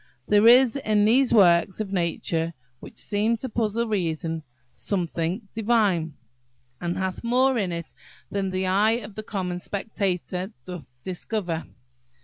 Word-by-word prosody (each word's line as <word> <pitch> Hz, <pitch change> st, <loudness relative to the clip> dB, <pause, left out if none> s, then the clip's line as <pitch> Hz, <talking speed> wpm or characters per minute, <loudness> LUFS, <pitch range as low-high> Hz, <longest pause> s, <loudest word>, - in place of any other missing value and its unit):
There 210 Hz, +1 st, +5 dB
is 250 Hz, +2 st, +7 dB
in 215 Hz, -5 st, +2 dB
these 250 Hz, +4 st, +4 dB
works 185 Hz, -3 st, +5 dB
of 200 Hz, -2 st, -3 dB
Nature, 170 Hz, -2 st, -1 dB, 0.3 s
which -, -, -12 dB
seem 215 Hz, +3 st, 0 dB
to 260 Hz, -, -5 dB
puzzle 230 Hz, 0 st, -1 dB
reason, 165 Hz, -5 st, -2 dB, 0.3 s
something 180 Hz, +2 st, -2 dB
divine, 205 Hz, -9 st, +1 dB, 0.7 s
and 175 Hz, 0 st, -2 dB
hath 190 Hz, +2 st, -3 dB
more 255 Hz, +3 st, +3 dB
in 190 Hz, -4 st, -1 dB
it 170 Hz, -1 st, -6 dB, 0.4 s
than 195 Hz, -1 st, -1 dB
the 185 Hz, 0 st, -1 dB
eye 205 Hz, +4 st, +3 dB
of 205 Hz, -1 st, -10 dB
a 215 Hz, -, -4 dB
common 185 Hz, -4 st, -3 dB
spectator 190 Hz, -1 st, -3 dB
doth 180 Hz, -8 st, -8 dB
discover." 180 Hz, -2 st, -3 dB
195 Hz, 135 wpm, -25 LUFS, 175-220 Hz, 0.7 s, is